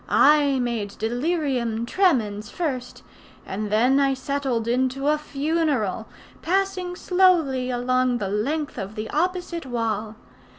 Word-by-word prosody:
I 290 -2 +5
made 235 -5 -2
delirium 245 -2 -1
tremens 225 - +1
first; 260 -8 -4 0.4
and 205 +2 -4
then 250 +6 +4
I 275 -1 +2
settled 265 -4 -2
into 260 +3 +1
a 305 - +3
funeral, 285 - -1 0.3
passing 370 0 -1
slowly 345 -10 +2
along 255 0 +1
the 205 -4 -3
length 280 +9 -2
of 195 +3 -6
the 215 0 -5
opposite 350 -1 -2
wall. 225 -3 -2
260 Hz, 120 wpm, -24 LUFS, 225-305 Hz, 0.4 s, I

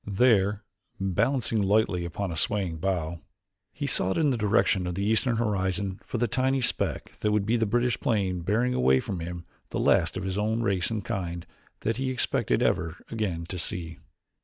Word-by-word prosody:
There, 105 -1 +3 0.4
balancing 110 +4 +1
lightly 100 -3 +2
upon 95 +2 -3
a - - -4
swaying 90 0 -1
bough, 85 -2 -2 0.5
he - - -4
sought 95 - +1
in 150 -3 +3
the - - +1
direction 105 -4 +2
of 90 - -3
the 100 +2 -1
eastern 110 +3 +2
horizon 100 -3 -1
for - - -4
the 120 +1 +1
tiny 130 +4 +1
speck 125 - -1
that 105 - +1
would 105 -1 +1
be 115 +3 +2
the 115 -2 +1
British 120 +3 +1
plane 95 -6 0
bearing 115 +8 +1
away 65 +1 +4
from 95 +6 -4
him 85 0 -6 0.2
the - - -4
last - - +2
of - - -4
his 95 +1 -2
own 110 +2 0
race 95 -5 +1
and 110 -3 -3
kind 85 -3 -3 0.4
that 115 +2 -1
he 130 0 -1
expected 130 -2 +1
ever 85 +1 0
again 95 -7 -2
to 90 +1 -5
see. 85 0 -3
100 Hz, 185 wpm, -27 LUFS, 90-115 Hz, 0.5 s, away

